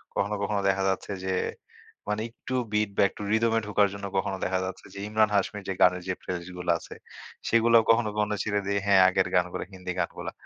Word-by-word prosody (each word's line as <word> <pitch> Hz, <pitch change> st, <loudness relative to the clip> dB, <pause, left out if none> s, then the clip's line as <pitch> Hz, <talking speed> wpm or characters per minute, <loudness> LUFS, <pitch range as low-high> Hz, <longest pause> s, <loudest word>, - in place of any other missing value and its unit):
কখনো, 105 Hz, +1 st, 0 dB
কখনো 100 Hz, 0 st, 0 dB
দেখা 95 Hz, 0 st, +1 dB
যাচ্ছে 95 Hz, -, -2 dB
যে, 95 Hz, 0 st, 0 dB, 0.7 s
মানে 105 Hz, +1 st, -1 dB
একটু 130 Hz, +2 st, -6 dB, 0.2 s
বিট 105 Hz, -1 st, +2 dB
বা -, -, +5 dB
একটু -, -, -12 dB
রিদম 115 Hz, +1 st, +2 dB
এ -, -, +4 dB
ঢোকার 105 Hz, -1 st, +3 dB
জন্য 100 Hz, 0 st, -6 dB
কখনো 95 Hz, 0 st, -1 dB
দেখা 95 Hz, 0 st, 0 dB
যাচ্ছে 95 Hz, 0 st, -7 dB
যে, 100 Hz, -, -8 dB
ইমরান 110 Hz, 0 st, +3 dB
হাশমির 100 Hz, +1 st, 0 dB
যে, 95 Hz, -, -1 dB
গানের 90 Hz, 0 st, +4 dB
যে, 95 Hz, -, 0 dB
প্লে -, -, -5 dB
লিস্ট 90 Hz, +1 st, -10 dB
গুলো 90 Hz, -1 st, +1 dB
আছে, -, -, -11 dB, 0.5 s
সেগুলোও 115 Hz, 0 st, +5 dB
কখনো, 115 Hz, -1 st, +4 dB
কখনো 105 Hz, 0 st, +1 dB
ছেড়ে 105 Hz, -1 st, 0 dB
দেই 100 Hz, 0 st, +1 dB
হ্যাঁ, 100 Hz, -2 st, +6 dB
আগের 95 Hz, 0 st, +1 dB
গানগুলো 90 Hz, -1 st, +1 dB
হিন্দি 90 Hz, -1 st, -5 dB
গানগুলা। 85 Hz, -, -3 dB
100 Hz, 210 wpm, -27 LUFS, 95-105 Hz, 0.7 s, হ্যাঁ